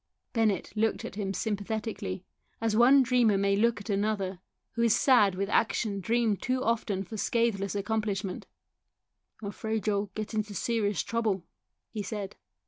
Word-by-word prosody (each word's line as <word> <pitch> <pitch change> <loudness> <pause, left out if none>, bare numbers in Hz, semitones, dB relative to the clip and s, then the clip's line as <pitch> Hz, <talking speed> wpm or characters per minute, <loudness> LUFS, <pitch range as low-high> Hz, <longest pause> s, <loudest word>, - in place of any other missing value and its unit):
Bennett 220 -6 +1
looked 220 +1 0
at - - -6
him 200 -2 -3
sympathetically, 205 -2 -3 0.3
as 225 -1 0
one 260 +4 +7
dreamer 240 -4 +3
may 200 0 +2
look 225 +1 +2
at 205 - -10
another, 200 -2 -1 0.3
who 235 - -3
is 230 -2 +4
sad 210 -8 +5
with 195 +1 -1
action 210 -1 +1
dreamed 225 +1 +1
too 255 +1 0
often 215 -4 0
for 215 +4 -8
scatheless 205 -4 0
accomplishment. 205 -2 -2 0.5
" - - -56
I'm 200 - -3
afraid 220 +1 -3
you'll 205 -1 0
get 215 +1 -4
into 215 -1 -2
serious 210 -6 0
trouble," 220 -6 -1 0.5
he 215 - -3
said. 205 -1 -5
210 Hz, 155 wpm, -29 LUFS, 200-225 Hz, 0.5 s, one